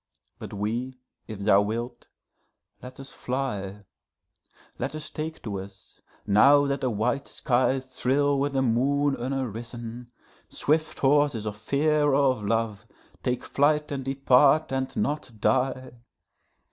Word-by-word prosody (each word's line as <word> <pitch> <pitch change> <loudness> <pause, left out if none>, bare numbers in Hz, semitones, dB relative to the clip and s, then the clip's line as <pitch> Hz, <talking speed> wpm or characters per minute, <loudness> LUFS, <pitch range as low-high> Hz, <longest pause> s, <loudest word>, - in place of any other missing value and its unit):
but - - -8
we, 115 +6 -3 0.3
if 110 - -7
thou 100 -1 +5
wilt, 120 +4 -4 0.7
let 130 +1 -11
us 135 0 -9
fly; 105 -7 -4 1.0
Let 150 - -3
us 155 0 -6
take 160 +1 -6
to 100 -4 -4
us, 95 0 -13 0.2
now 140 +8 +5
that 140 -1 -1
the 130 - +1
white 125 +6 -1
skies 130 +1 0
thrill 135 +2 +1
with 140 0 -1
a 135 - +2
moon 140 +4 +1
unarisen, 120 -2 -5 0.4
Swift 155 +1 0
horses 140 -5 +2
of 105 -1 -3
fear 145 +8 +1
or 140 -1 +4
of 110 -5 -5
love, 110 -1 -1 0.3
take 125 0 -2
flight 150 +1 +1
and 135 -2 -3
depart 135 +3 +3
and 130 0 -3
not 145 -4 -2
die. 130 +2 0
130 Hz, 135 wpm, -26 LUFS, 115-140 Hz, 1.0 s, thou